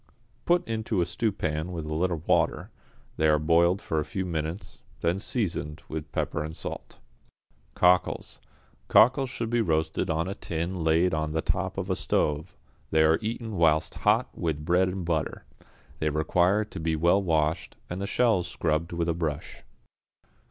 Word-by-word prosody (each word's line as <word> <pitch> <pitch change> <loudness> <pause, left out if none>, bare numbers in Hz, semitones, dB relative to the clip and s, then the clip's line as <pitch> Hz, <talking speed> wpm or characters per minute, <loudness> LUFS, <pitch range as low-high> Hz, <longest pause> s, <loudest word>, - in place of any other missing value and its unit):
Put 175 0 +2
into 110 -3 -1
a - - +2
stewpan 85 -3 -2
with 80 -3 -5
a 75 - -4
little 85 0 -1
water, - - +1 0.5
they 80 - +3
are 75 0 +5
boiled 85 +5 +3
for 80 - -1
a - - 0
few 95 +5 -4
minutes, 80 +2 -4 0.2
then 85 +3 +1
seasoned 85 - -2
with 75 -2 -5
pepper 75 - -2
and 80 +1 -6
salt. - - -7 0.8
=Cockles.= 90 0 +2 0.5
Cockles 130 +3 +5
should 115 -3 -4
be 120 0 +2
roasted 80 -1 0
on 80 +2 0
a 95 - -3
tin 85 0 -4
laid 80 +3 +3
on 80 -1 -1
the 80 - 0
top - - -1
of - - -2
a - - +2
stove; 75 +1 -1 0.3
they 80 0 +4
are 80 +1 +4
eaten 110 -1 -4
whilst 80 -2 +3
hot - - +1
with 75 -3 -2
bread 90 +2 +3
and 90 -1 -4
butter. 80 -3 -2 0.5
They 80 - +1
require 90 +7 +2
to - - -8
be 80 0 0
well 85 +5 +3
washed, 80 -2 0
and 90 +2 -5
the 100 - -2
shells 110 -8 +2
scrubbed 80 +1 -1
with 85 0 -1
a 85 - +2
brush. 80 -4 -4
85 Hz, 170 wpm, -27 LUFS, 80-95 Hz, 0.8 s, are